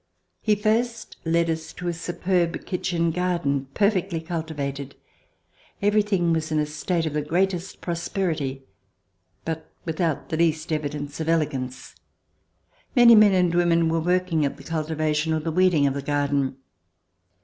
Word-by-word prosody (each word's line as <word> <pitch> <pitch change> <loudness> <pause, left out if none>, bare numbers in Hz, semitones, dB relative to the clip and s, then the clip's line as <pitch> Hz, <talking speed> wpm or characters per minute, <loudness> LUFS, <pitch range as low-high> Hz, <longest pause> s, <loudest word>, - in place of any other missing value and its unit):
He 215 -1 +3
first 230 +2 -1
led 170 +1 +2
us 160 -1 -3
to 180 - -6
a 175 - 0
superb 175 0 -1
kitchen 175 -3 0
garden 170 -6 -1
perfectly 195 -4 +1
cultivated. 150 -5 -4 0.8
Everything 205 -4 +2
was 160 -1 -1
in 155 - +1
a 150 - +2
state 160 +3 -2
of 155 - -2
the 150 - 0
greatest 180 +4 -1
prosperity, 165 -6 -2 0.8
but 160 -1 -4
without 160 -1 -1
the 160 - -1
least 160 -1 +1
evi 155 -2 0
dence 145 0 -6
of 160 0 -2
elegance. 135 -6 -1 1.0
Many 240 -2 +8
men 210 -2 +7
and 180 -2 +3
women 170 -1 +3
were 165 0 +1
working 180 -2 +1
at 140 - -1
the - - -12
cultivation 155 -1 -1
or 160 - +1
the 160 +1 -3
weeding 180 -4 +3
of 140 - +2
the 140 - -3
garden. 140 -2 0
165 Hz, 150 wpm, -24 LUFS, 150-180 Hz, 1.0 s, Many